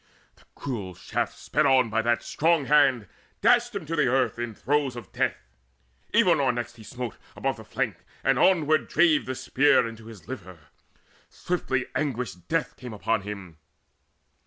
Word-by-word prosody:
The - - -23
cruel 105 -10 -5
shaft, - - -3
Sped 150 - +1
on 130 -4 +4
by 115 0 +2
that 120 +1 +1
strong 165 -2 +2
hand, 135 -7 +4 0.3
dashed 240 +1 +3
him 195 -5 -4
to 160 - -5
earth 130 -5 +2
In 120 -2 -4
throes 140 +1 0
of 120 -6 -9
death. - - 0 0.7
Evenor 170 - +4
next 120 0 -5
he 110 - -12
smote 125 0 -6 0.2
Above - - -1
the - - -10
flank, - - -2 0.3
and - - +2
onward 155 -4 +3
drave 155 -3 +3
the 130 - -3
spear 130 0 +3
Into 115 -1 -10
his 105 -7 -12
liver: 95 -8 -8 0.7
swiftly 130 -8 -2
anguished 120 - -3
death 165 -1 -1
Came 125 -3 -8
upon 110 +1 0
him. 95 -5 -8
130 Hz, 160 wpm, -26 LUFS, 115-150 Hz, 0.7 s, on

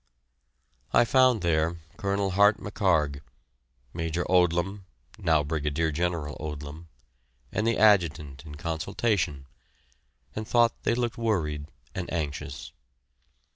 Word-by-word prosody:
I - - +6
found 130 -4 +4
there 85 0 +1 0.2
Colonel 100 0 0
Hart 100 +3 +5
McHarg, 80 -10 0 0.7
Major 85 +1 -2
Odlum 90 +2 +2 0.3
(now 80 -2 +3
Brigadier 75 +1 -1
General 80 -2 -2
Odlum), 75 +2 -7 0.6
and 105 - 0
the 115 - +2
Adjutant 80 -10 +3
in 75 -2 -9
consultation, 80 -1 -1 0.9
and 110 0 -4
thought 120 -1 +4
they 115 - +1
looked 120 -2 -2
worried 75 -10 -1 0.3
and 90 -2 -5
anxious. 75 -3 -4
85 Hz, 105 wpm, -27 LUFS, 75-100 Hz, 0.9 s, I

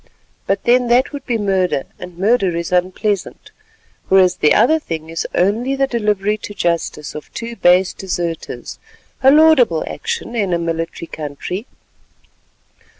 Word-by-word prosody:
But 195 0 0
then 245 +1 +3
that 245 +4 +2
would 285 - -8
be 240 -3 0
murder 190 -8 0 0.2
and 180 -1 -10
murder 195 -3 +2
is 170 +1 -4
unpleasant; 185 +2 -1 0.6
whereas 190 -1 +4
the 150 - +3
other 285 +9 +4
thing 160 - -6
is 165 - -3
only 225 +9 +1
the 270 0 +2
delivery 210 -4 0
to 205 - -8
justice 170 -4 -2
of 150 - -9
two 235 0 -5
base 180 -2 +3
deserters, 175 -3 -5 0.4
a 265 - +6
laudable 285 - +5
action 465 - -5
in 200 -5 0
a - - +2
military 165 0 -3
country. 160 - -6
195 Hz, 145 wpm, -18 LUFS, 170-235 Hz, 0.6 s, a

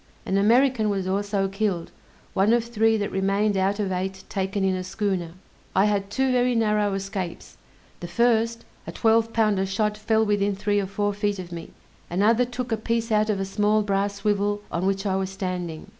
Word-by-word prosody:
An 190 - -1
American 230 +2 +3
was 195 -2 -1
also 200 0 0
killed, 195 -3 -2 0.4
one 200 +4 +3
of 235 -1 +3
three 225 -1 +2
that 205 -1 -2
remained 195 +2 +1
out 195 +2 +1
of 200 -2 -1
eight 190 +1 -3
taken 195 0 -2
in 190 -1 +2
a 185 0 -3
schooner. 185 -3 -2 0.4
I 195 - +5
had 200 -2 0
two 265 +4 +1
very 250 0 +2
narrow 210 -3 +1
escapes: 195 -3 -5 0.4
the 175 - -6
first, 230 +3 +1 0.2
a - - -4
twelve 225 0 +2
pounder 210 -4 +1
shot 210 +2 0
fell 220 +1 +1
within 205 -1 +1
three 205 +1 0
or 195 - -2
four 205 +1 -1
feet 205 0 -1
of 180 -2 -8
me; 170 -1 -7 0.4
another 220 +7 +3
took 245 0 -5
a 225 - +1
piece 230 +1 -2
out 215 0 +2
of 205 -2 0
a 195 - -1
small 210 +2 +1
brass 200 0 0
swivel 205 0 0
on 180 +3 -1
which 195 +1 -1
I 190 -1 +1
was 190 -1 -1
standing. 180 -4 -4
205 Hz, 195 wpm, -24 LUFS, 195-220 Hz, 0.4 s, I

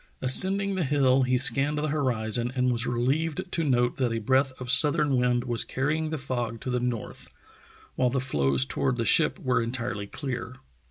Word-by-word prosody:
Ascending 195 +9 +3
the 190 -2 -1
hill 135 -2 +2
he 125 0 +1
scanned 140 +3 +1
the 150 +1 -2
horizon 120 -5 -2
and 125 -1 +1
was 120 0 -2
relieved 140 +8 -1
to 165 - -1
note 125 -4 0
that 125 -4 0
a 115 - -2
breath 130 +4 +1
of 130 0 -3
southern 150 -1 +5
wind 125 -1 +1
was 120 -2 0
carrying 155 +4 -2
the 160 - -3
fog 120 -4 -4
to 130 - -4
the 125 - 0
north, 120 -2 -5 0.7
while 125 -1 0
the 130 +2 -1
floes 70 - +1
toward 70 0 -1
the - - -3
ship - - +3
were 125 -2 0
entirely 115 -3 -4
clear. 125 -1 -6
130 Hz, 185 wpm, -26 LUFS, 120-145 Hz, 0.7 s, southern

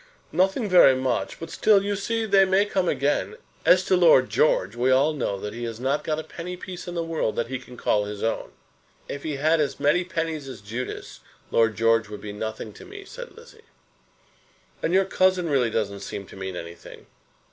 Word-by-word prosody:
"Nothing 195 +5 +1
very 175 -8 +7
much; 130 -1 -2
but 165 0 -7
still, 205 -2 +4
you 205 0 -1
see, 225 +3 -1
they 200 -2 +5
may 190 +2 +3
come 190 -3 0
again. 145 - 0 0.3
As 185 0 +6
to 185 - +3
Lord 160 -8 +5
George, 100 -8 +2
we 125 +2 +1
all 135 +4 +4
know 110 -9 -2
that 105 +1 -5
he 120 +1 -6
has 115 -1 -6
not 135 +4 0
got 155 -1 -1
a 160 - -4
penny 180 +3 -7
piece 180 0 -8
in 175 - -5
the 170 - -1
world 165 -9 -2
that 115 - -2
he 135 -1 -3
can 125 -1 -13
call 105 -2 +1
his 105 0 -6
own." 115 - -1 0.6
"If 140 - -6
he 155 -1 -3
had 155 +4 +2
as 145 -3 -1
many 150 +6 +3
pennies 165 -4 -3
as 125 -6 -9
Judas, 115 +5 -6 0.3
Lord 115 -1 +3
George 115 +1 +2
would 105 - -8
be 105 -1 -7
nothing 110 0 -5
to - - -13
me," 400 0 -11
said - - -10
Lizzie. 455 -1 -16 1.2
"And 165 - 0
your 190 +1 +4
cousin 185 -2 +2
really 135 -6 +2
doesn't 100 -3 -2
seem 100 - -6
to - - -12
mean 95 -1 -5
anything." 85 0 -10
145 Hz, 210 wpm, -25 LUFS, 115-185 Hz, 1.2 s, very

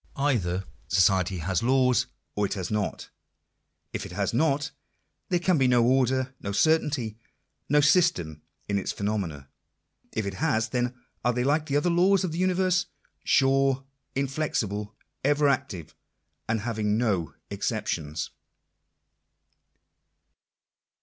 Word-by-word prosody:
Either 100 -11 0 0.2
society 95 0 +3
has 90 +2 -1
laws, 125 0 +3 0.3
or 105 -1 +1
it - - -3
has 95 -1 -4
not. 105 -1 -2 0.8
If - - -3
it - - -8
has - - -1
not, 145 +2 +1 0.6
there 180 - +3
can 175 -2 +2
be 130 - +4
no 120 -2 +4
order, 130 +1 +2
lno 100 0 -3
certainty, 140 -7 +1 0.5
no 150 +1 +5
system 140 - +2 0.3
in 100 -1 +1
its 95 - -2
phenomena. 95 -10 -3 0.6
If 110 - -2
it 100 - -3
has, 110 -3 0
then 125 +1 -1 0.3
are 125 - +2
Jthey 125 +1 0
like 150 +2 +1
the 140 -1 +1
other 170 +4 +2
laws 190 +3 +4
of 180 - -1
the 165 - -4
universe 185 -1 +2 0.2
— - - -45
sure, 135 0 +3 0.3
inflexible, 115 -7 -2 0.3
ever 145 +1 +3
(active, 120 - -1 0.6
and 110 -1 +1
having 110 -2 0
no 95 - 0 0.2
exceptions. 75 0 -2
125 Hz, 130 wpm, -27 LUFS, 100-145 Hz, 0.8 s, no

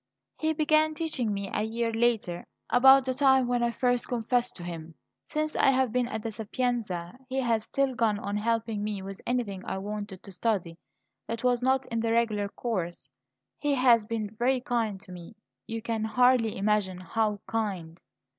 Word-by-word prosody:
"He 315 0 +1
began 310 0 +3
teaching 300 -9 -2
me 200 -1 -3
a - - 0
year 230 +1 -1
later, 225 -7 +1 0.3
about 265 +1 +7
the 260 - 0
time 265 -1 +4
when 245 0 +1
I 235 - +2
first 245 0 0
confessed 245 +1 0
to 175 - -9
him. 165 -2 -7 0.3
Since 305 0 -2
I - - +4
have 260 -3 +2
been 250 0 +1
at 220 -3 -4
the 225 - -3
Sapienza 220 -4 -3
he 265 +1 -1
has 230 -3 +1
still 275 -1 0
gone 225 -3 +1
on 205 0 -4
helping 225 -1 -1
me 205 -2 -3
with 195 0 -8
anything 220 -7 -1
I 190 - -3
wanted 205 -1 -6
to 200 - -11
study 180 -5 -1 0.5
that 230 +1 -4
was 250 -1 +2
not 265 +1 +2
in 230 -2 -3
the 225 0 0
regular 215 -3 +1
course. 185 -7 -4 0.5
He 290 -1 +1
has 245 -4 +5
been 220 -1 -4
very 255 +2 +2
kind 230 -5 -1
to 190 - -13
me 180 +4 -10 0.3
you 225 -1 -4
can 225 -2 -2
hardly 245 0 +3
imagine 195 -2 0
how 210 +2 0
kind." 190 -7 -3
225 Hz, 185 wpm, -28 LUFS, 205-250 Hz, 0.5 s, about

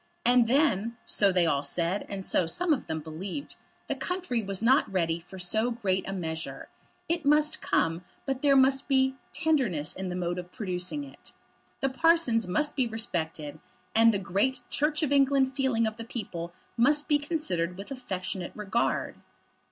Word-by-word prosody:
And 245 -1 +5
then, 235 -4 +2
so 200 -2 +3
they 180 -2 +3
all 145 -4 +2
said, 170 +6 -1
and 195 -1 -5
so 170 - +2
some 335 - +1
of 275 - -3
them 160 0 -3
believed, 180 - -6 0.3
the - - -1
country 360 -11 -2
was 195 0 -2
not 260 -1 +4
ready 170 -3 0
for 185 +3 -12
so 215 +6 +1
great 195 -6 -1
a - - -2
measure. 165 -4 -5 0.4
It 335 0 -1
must 300 +1 +3
come; 165 +2 0 0.2
but 270 -1 -2
there 280 -2 +4
must 270 0 +4
be 265 -1 +3 0.2
tenderness 235 - +1
in 190 -1 -4
the 180 - -3
mode 175 0 -2
of 180 0 -9
producing 185 +7 -2
it. 275 - -14 0.5
The 270 - +2
parsons 265 - +3
must 295 +12 0
be 260 -3 +1
respected, 165 -9 -3 0.3
and 230 +1 +6
the 205 - 0
great 200 +8 0
Church 300 +2 +1
of 290 - 0
England 275 -1 +3
feeling 260 -5 +1
of 220 0 -3
the 230 - -6
people 175 -8 -5 0.2
must 290 +5 +3
be 295 -2 +3
considered 185 - -2
with 200 +7 -9
affectionate 185 -7 -4
regard. 210 +2 -1
225 Hz, 175 wpm, -28 LUFS, 180-275 Hz, 0.5 s, and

